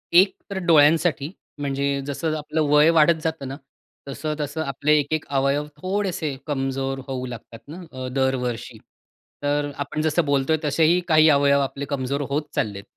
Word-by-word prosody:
एक 190 +2 +6
तर 195 - -4
डोळ्यांसाठी 155 -1 +4 0.3
म्हणजे 140 -1 -2 0.2
जसं 155 +2 -2
आपलं 155 +1 -2
वय 150 +2 +6
वाढत 160 0 +4
जातं 160 -4 -3
ना, 135 - -5 0.5
तसं-तसं 150 +1 -4
आपले 145 +2 0
एक-एक 155 +2 -2
अवयव 140 +2 +1
थोडेसे 185 -6 -2
कमजोर 135 -1 -2
होऊ 130 -1 -4
लागतात 115 -1 -9
ना 165 +5 -9
अ, 130 0 -6
दरवर्षी. 125 -3 -1 0.7
तर 145 0 0
आपण 155 +2 -4
जसं 155 +1 +1
बोलतो 140 +2 +1
आहे, 155 - +1
तसेही 160 +4 +3
काही 155 -1 +6
अवयव 140 -1 +4
आपले 140 +1 -3
कमजोर 140 0 -2
होत 145 +2 0
चाललेत. 100 -2 -2
145 Hz, 155 wpm, -23 LUFS, 135-155 Hz, 0.7 s, एक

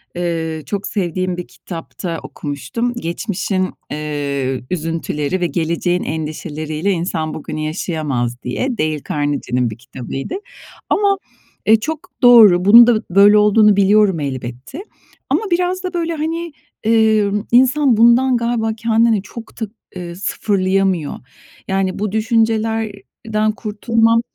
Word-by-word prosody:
eee, 165 -2 -3
çok 200 +7 -3
sevdiğim 185 -2 -2
bir 180 - -6
kitapta 165 -1 -7
okumuştum: 230 - -4
"Geçmişin, 185 -1 -2 0.2
eee, 140 -4 -3
üzüntüleri 165 0 -2
ve 175 - +2
geleceğin 170 +3 -1
endişeleriyle 155 +2 -3
insan 165 -3 -2
bugünü 155 0 -6
yaşayamaz" 150 -7 -2
diye, 240 - -2
Dale 155 -1 -1
Carnegie'nin 140 -4 -1
bir 110 - -8
kitabıydı. 130 - -6 0.5
Ama, 400 -1 +2 0.5
eee, 220 0 +6
çok 315 +8 -5
doğru, 215 -7 +7
bunun 235 +3 +9
da 225 -3 +3
böyle 200 +2 +6
olduğunu 210 0 +5
biliyorum 200 -2 +4
elbette. 130 - -6 0.5
Ama - - +2
biraz 360 +2 0
da, 365 0 -4
böyle, 335 -1 -1
hani, 330 +1 -3 0.3
emm, 215 -2 +2
insan 260 0 +4
bundan 240 +2 +5
galiba 235 -1 -1
kendini 225 -2 +2
çok 225 +3 -11
da, 220 - -1 0.3
eee, 175 -1 -6
sıfırlayamıyor. 190 -4 0 0.5
Yani, 190 -1 -1
bu 210 -1 -2
düşüncelerden 220 -1 -1
kurtulmam, 230 +1 +1
195 Hz, 120 wpm, -18 LUFS, 160-230 Hz, 0.5 s, bunun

